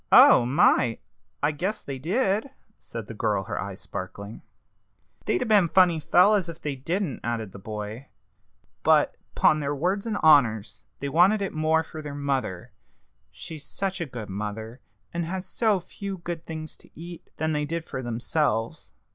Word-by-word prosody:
"Oh, 120 - +8
my! 125 -4 +4 0.5
I 145 - +3
guess 185 +9 -3
they 135 -2 -6
did!" 205 - 0 0.3
said 115 -2 -7
the 115 - -8
girl, 105 -2 0
her - - -4
eyes 95 -1 -6
sparkling. 100 +2 -7 0.8
"They'd - - +1
'a - - -4
been 210 -6 +5
funny 170 -1 +4
fellows 180 +4 +4
if 165 -1 -8
they 145 -4 -3
didn't," 165 +3 -2
added 115 -4 -3
the 100 - -10
boy; 105 +5 -6 0.7
"but, - - +4 0.2
'pon 155 - +4
their 145 0 -1
words 185 +9 -1
and 215 -2 -1
honors, 115 -9 +4 0.2
they 140 - -2
wanted 185 +8 +4
it 195 - -3
more 160 +1 +2
for 160 0 -8
their 145 -2 -6
mother 135 -11 -2 0.6
she's 145 - -9
such 190 +4 -3
a 165 - -2
good 120 -5 -7
mother, 110 +4 -5 0.3
and 170 0 -1
has 185 +2 -4
so 210 +1 +1
few 195 +2 -7
good 170 -1 -6
things 155 -1 -6
to - - -19
eat 170 0 -10
than 160 0 0
they 150 -1 0
did 165 +2 -4
for 130 - -5
themselves. 120 -1 -1
150 Hz, 170 wpm, -26 LUFS, 115-175 Hz, 0.8 s, Oh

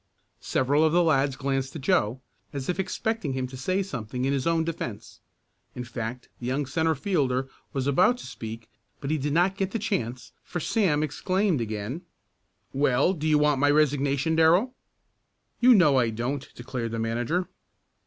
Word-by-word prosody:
Several 145 +4 +1
of 160 0 +3
the 175 0 +5
lads 140 -4 +2
glanced 135 0 -2
at 150 - -6
Joe, 130 - +1 0.3
as 140 +1 -4
if 180 - -1
expecting 220 - -2
him 130 -1 -2
to 130 +1 -8
say 185 +9 0
something 125 - -4
in 135 - +1
his 135 +2 -1
own 165 -1 +2
defense. 115 -10 -6 0.6
In 125 - -4
fact 120 0 -5
the 120 - -5
young 135 +3 0
centre 160 +4 +1
fielder 135 -5 0 0.2
was 135 -2 -2
about 180 - +4
to - - -10
speak 115 0 -8 0.3
but 140 0 -3
he 155 - +1
did 145 +2 -1
not 175 +5 +2
get 195 -1 -1
the 225 - -2
chance, 130 - -3
for 175 - -4
Sam 165 -6 +1
exclaimed 185 - 0
again: 110 +7 -4 0.7
"Well, 140 +4 +3
do 155 -3 -3
you 155 -1 +4
want 150 -2 +3
my 145 - +4
resignation, 145 +1 +2
Darrell?" 175 +10 +4 0.9
"You 245 0 +7
know 150 -9 +5
I 120 -2 +2
don't!" 125 +5 -3
declared 120 -2 -4
the - - -2
manager. 120 +11 -1
145 Hz, 175 wpm, -26 LUFS, 125-170 Hz, 0.9 s, You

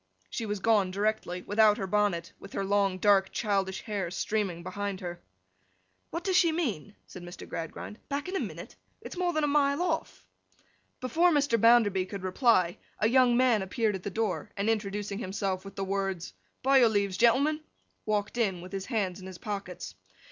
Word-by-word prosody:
She 225 - -3
was 210 0 -1
gone 205 -2 +3
directly, 195 -2 -1
without 210 0 +4
her 195 - -2
bonnet; 190 -4 0
with 195 - -12
her 195 - -2
long, 195 -1 +2
dark, 195 -1 +4
childish 195 -3 -1
hair 200 -5 -3
streaming 185 -2 -2
behind 195 +1 -4
her. 175 -2 -6 0.9
'What 335 +1 -4
does 375 -1 0
she 345 -2 +5
mean!' 215 - -2
said 185 - -11
Mr. 175 +1 -9
Gradgrind. 165 +6 -6
'Back 285 +4 -2
in 370 - -4
a - - +1
minute? - - -6 0.2
It's - - -9
more 355 -1 0
than 310 -2 0
a - - +3
mile 285 -1 +2
off.' 360 - -3 0.8
Before 325 +8 +3
Mr. 285 -8 +2
Bounderby 210 -5 +5
could 195 -1 -7
reply, 185 -2 +2 0.2
a 215 - +2
young 245 0 +4
man 245 -4 +4
appeared 210 +3 0
at 190 - -4
the 200 - -4
door, 215 0 -2
and 205 +3 +2
introducing 205 -1 -3
himself 190 -2 -2
with 195 0 -10
the 195 - -2
words, 195 -3 -2 0.3
'By 270 +1 +6
your 240 -3 +6
leaves, 200 -3 0
gentlemen!' 275 +6 +4 0.4
walked 210 +2 -1
in 195 -6 0
with 180 - -10
his 195 -1 -4
hands 195 -6 -1
in 185 - -9
his 185 -2 -8
pockets. 185 - -6
205 Hz, 185 wpm, -29 LUFS, 190-235 Hz, 0.9 s, By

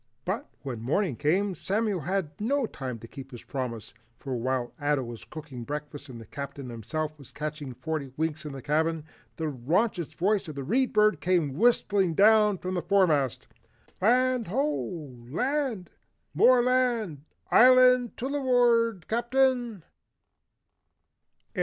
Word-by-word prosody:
But - - -3
when 125 -5 -5
morning 150 - 0
came, 190 - +1
Samuel 200 +3 -1
had 175 0 -2
no 270 +4 +1
time 130 - -6
to 115 +1 -11
keep 135 +2 -10
his 120 -3 -10
promise, 125 -5 -5 0.2
for 135 -2 -5
while 125 0 -2
Ato 145 -2 +1
was 120 -2 -8
cooking 150 -6 -8
breakfast 145 +1 -6
and 120 -2 -9
the 115 - -11
Captain 140 +1 -7
himself 150 +8 -3 0.2
catching 150 -3 -5
forty 140 +1 -4
winks 160 0 -2
in 150 - -6
the 135 -1 -8
cabin, 160 +2 0 0.3
the 160 - -3
raucous 165 - 0
voice 200 +1 +1
of 155 - -7
the 140 - -4
Read 250 - +1
Bird 215 0 +3
came 175 -6 +1
whistling 200 - +2
down 210 0 +5
from 185 +1 -4
the 180 - -1
foremast. 165 - +2 0.6
"Land 250 +2 +3
Ho! 180 - -2
Land! 250 - -1 0.4
More 250 -1 +5
Land. 240 - +1 0.3
Island 250 -1 +6
tuluward, 245 -6 +2
Captain!" 240 -3 +1
170 Hz, 135 wpm, -27 LUFS, 140-230 Hz, 0.6 s, Island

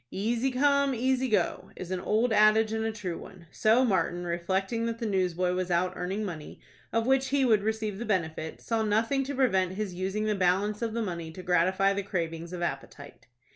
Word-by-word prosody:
"Easy 230 +6 0
come, 280 +1 +2
easy 260 +2 +1
go," 205 -5 0
is 185 0 -7
an 185 - -1
old 220 +5 +1
adage 215 +1 +4
and 220 0 -1
a 225 - -1
true 190 -6 -5
one. 180 -2 -12
So 230 +4 +3
Martin, 175 -4 0
reflecting 190 +7 -1
that 230 0 -3
the 230 - -4
newsboy 185 -3 0
was 185 0 -2
out 180 +1 +1
earning 190 +4 -3
money, 160 -6 -7 0.3
of 230 0 +1
which 265 +1 +2
he 275 0 +2
would 220 -4 +4
receive 215 -1 -2
the - - -3
benefit, 160 -6 -2
saw 230 -1 -1
nothing 225 +6 +1
to 280 +1 -4
prevent 190 -9 +2
his 200 -1 -4
using 190 +4 -2
the 215 - +1
balance 195 +3 +1
of 230 -2 -2
the 230 - 0
money 170 -5 -4
to 185 - -9
gratify 185 +3 +2
the 200 - -1
cravings 170 -3 -4
of 175 -1 -4
appetite. 140 -3 -6
200 Hz, 205 wpm, -28 LUFS, 180-230 Hz, 0.3 s, adage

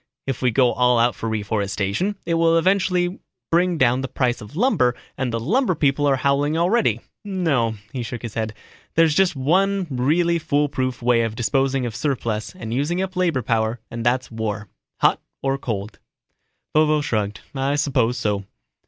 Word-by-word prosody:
If 135 - -3
we 125 - +3
go 125 +1 +3
all 125 0 +3
out 120 +1 +3
for 115 - -4
reforestation, 105 - -1
it 170 - 0
will 165 0 +4
eventually 180 0 +1 0.3
bring 175 +1 +3
down 130 -1 +3
the 135 - -3
price 125 -1 -1
of 105 +7 -11
lumber 170 - +2 0.2
and 130 -2 -2
the 115 - -1
lumber 185 - +1
people 145 -1 +2
are 140 - +4
howling 140 +3 +1
already. 195 +8 +2 0.2
No," 160 - 0 0.2
he 130 - -3
shook 120 +1 -6
his 115 - -5
head, 110 -1 -3 0.4
"there's 165 -2 +4
just 185 0 +3
one 190 +8 +2
really 165 +7 +2
foolproof 145 -5 -1
way 120 -1 +4
of 115 -1 -2
disposing 130 +3 +1
of 115 -2 -4
surpluses 120 - -2
and 115 -11 -6
using 145 +8 0
up 190 0 -3
labor 170 -8 +1
power 110 +1 0
and 115 0 -4
that's 125 +1 0
war 105 -2 -4 0.3
hot - - +3 0.2
or 135 0 0
cold." 105 -5 -4 0.8
Vovo 155 -1 +4
shrugged, 105 -7 -2
"I 135 +1 0
suppose 130 -4 +1
so." 105 -4 -1
135 Hz, 170 wpm, -22 LUFS, 115-165 Hz, 0.8 s, will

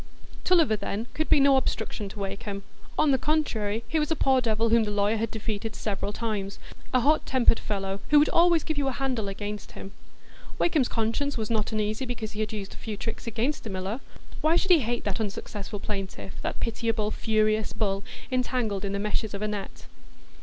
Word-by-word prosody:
Tulliver, 330 -11 +4
then, 205 +2 -3
could 315 - -1
be - - +6
no 275 -1 +6
obstruction 220 -5 -2
to 205 - -11
Wakem; 200 0 -4 0.3
on 305 -2 +4
the 265 - +3
contrary, 230 -9 0
he 320 - +1
was 300 - 0
a 320 - +2
poor 265 -2 +3
devil 225 -1 +1
whom 230 0 +5
the 210 - -2
lawyer 205 +1 +2
had 225 +1 -1
defeated 220 0 -3
several 205 -1 -2
times; 205 -3 -3 0.3
a 255 - +4
hot 300 +5 +4
tempered 255 -3 +4
fellow, 195 -1 -2
who 295 - +7
would 295 +1 +6
always 340 -1 +5
give 315 -2 -2
you 280 - +1
a 270 - 0
handle 255 -5 -1
against 205 +1 -5
him. 195 - -8 0.7
Wakem's 310 -7 +3
conscience 230 +5 0
was 220 0 -2
not 215 -2 +1
uneasy 215 +3 -1
because 225 -3 -4
he 215 - -7
had 215 -1 -1
used 205 -2 -5
a - - -11
few 215 -2 -5
tricks 225 +1 -5
against 240 +6 -1
the 225 - -5
miller; 190 +4 -3 0.4
why 315 +2 +4
should 375 +2 +2
he 345 - +8
hate 240 -2 -1
that 205 0 -1
unsuccessful 205 0 -4
plaintiff, 195 - -4
that - - -3
pitiable, 225 -2 0
furious 215 -1 +1
bull 200 -2 -1 0.3
entangled 245 -6 0
in 200 0 -2
the 200 - -1
meshes 210 0 -1
of 200 - -4
a - - +1
net? 205 -2 -5
220 Hz, 205 wpm, -27 LUFS, 205-255 Hz, 0.7 s, he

